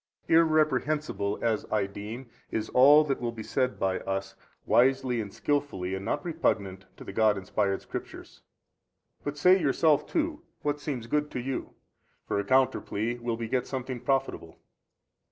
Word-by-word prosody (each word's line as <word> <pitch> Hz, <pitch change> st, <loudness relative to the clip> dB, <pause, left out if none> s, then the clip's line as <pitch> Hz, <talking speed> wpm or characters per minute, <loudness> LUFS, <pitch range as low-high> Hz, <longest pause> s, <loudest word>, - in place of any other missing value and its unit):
A. -, -, -7 dB
Irreprehensible 155 Hz, -8 st, +2 dB
as 115 Hz, -2 st, +1 dB
I 105 Hz, -2 st, +2 dB
deem 105 Hz, +6 st, -7 dB, 0.2 s
is 110 Hz, 0 st, -3 dB
all 145 Hz, +4 st, +7 dB
that 140 Hz, -4 st, -2 dB
will 120 Hz, -1 st, -1 dB
be 115 Hz, -2 st, -8 dB
said 130 Hz, +1 st, -1 dB
by 95 Hz, -1 st, 0 dB
us, 95 Hz, 0 st, -3 dB, 0.3 s
wisely 130 Hz, -1 st, +3 dB
and 100 Hz, -2 st, -7 dB
skilfully 140 Hz, -12 st, -2 dB
and 95 Hz, 0 st, -4 dB
not 140 Hz, -, -2 dB
repugnant 100 Hz, -, -1 dB
to -, -, -10 dB
the -, -, -8 dB
God 110 Hz, -1 st, +3 dB
inspired 95 Hz, +1 st, -1 dB
Scriptures. -, -, -8 dB, 0.8 s
But 145 Hz, 0 st, -4 dB
say, 180 Hz, +5 st, +5 dB
yourself 150 Hz, +1 st, +3 dB
too, 320 Hz, -1 st, -1 dB, 0.2 s
what 145 Hz, 0 st, -1 dB
seems 135 Hz, -6 st, -4 dB
good 150 Hz, +5 st, 0 dB
to -, -, -4 dB
you: 130 Hz, +2 st, -4 dB, 0.5 s
for -, -, 0 dB
a -, -, 0 dB
counter 130 Hz, +4 st, +3 dB
plea 115 Hz, +4 st, -3 dB
will 120 Hz, -1 st, -2 dB
beget 120 Hz, +2 st, -2 dB
something 130 Hz, -1 st, -4 dB
profitable. 135 Hz, +1 st, -2 dB
125 Hz, 160 wpm, -28 LUFS, 105-145 Hz, 0.8 s, all